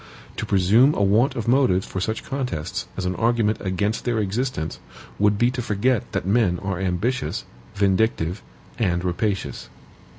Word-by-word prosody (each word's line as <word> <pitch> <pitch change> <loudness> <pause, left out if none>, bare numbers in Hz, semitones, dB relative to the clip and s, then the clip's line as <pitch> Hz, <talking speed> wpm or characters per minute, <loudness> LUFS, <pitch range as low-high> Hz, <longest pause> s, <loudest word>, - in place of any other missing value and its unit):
To - - -3
presume 105 +9 +4
a 100 - +1
want 110 +8 +3
of 115 - -3
motives 120 -8 +3
for 95 - -5
such 110 +3 -2
contests 125 - -3
as 95 - -2
an 90 - 0
argument 115 -2 +1
against 100 +3 -1
their 120 -2 0
existence, 105 - -2 0.4
would 105 0 +3
be 120 +3 +3
to 125 -1 -3
forget 115 +2 0
that 95 - -1
men 100 -3 +2
are 95 -2 -2
ambitious, 95 +8 -1 0.3
vindictive, 100 -2 +1 0.4
and 90 -6 +1
rapacious. 90 - -2
105 Hz, 155 wpm, -23 LUFS, 95-120 Hz, 0.4 s, presume